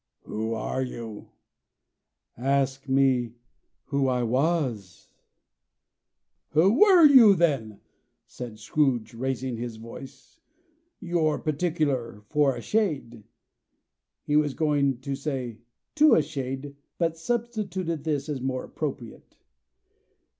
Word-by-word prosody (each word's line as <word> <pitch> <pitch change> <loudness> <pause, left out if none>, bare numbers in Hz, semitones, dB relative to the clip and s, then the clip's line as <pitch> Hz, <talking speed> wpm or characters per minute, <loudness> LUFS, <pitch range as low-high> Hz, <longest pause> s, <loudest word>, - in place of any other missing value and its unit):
"Who 110 +1 -3
are 115 +4 -3
you?" 115 -4 -7 1.1
"Ask 135 +1 -1
me 130 -3 +2 0.5
who 140 -2 0
I 125 -1 +1
was." 125 - -1 1.4
"Who 170 +7 +5
were 380 -6 +7
you 245 -8 +8
then?" 135 - 0 0.4
said 120 -3 -9
Scrooge, 125 +1 0
raising 130 0 -3
his 120 -1 -5
voice. 115 - -12 0.6
"You're 170 -4 0
particular, 145 - -2
for 145 -3 +2
a - - -6
shade." 140 - -2 1.0
He 150 - -1
was 150 -2 +2
going 140 -5 +1
to 140 +1 -4
say 135 -5 -4 0.3
"to 310 0 +6
a 155 - +3
shade," 135 0 -5 0.2
but 165 -2 0
substituted 190 -5 -3
this, 145 -3 -2
as 145 -4 -4
more 130 0 -2
appropriate. 130 -6 -7
135 Hz, 105 wpm, -26 LUFS, 120-160 Hz, 1.4 s, you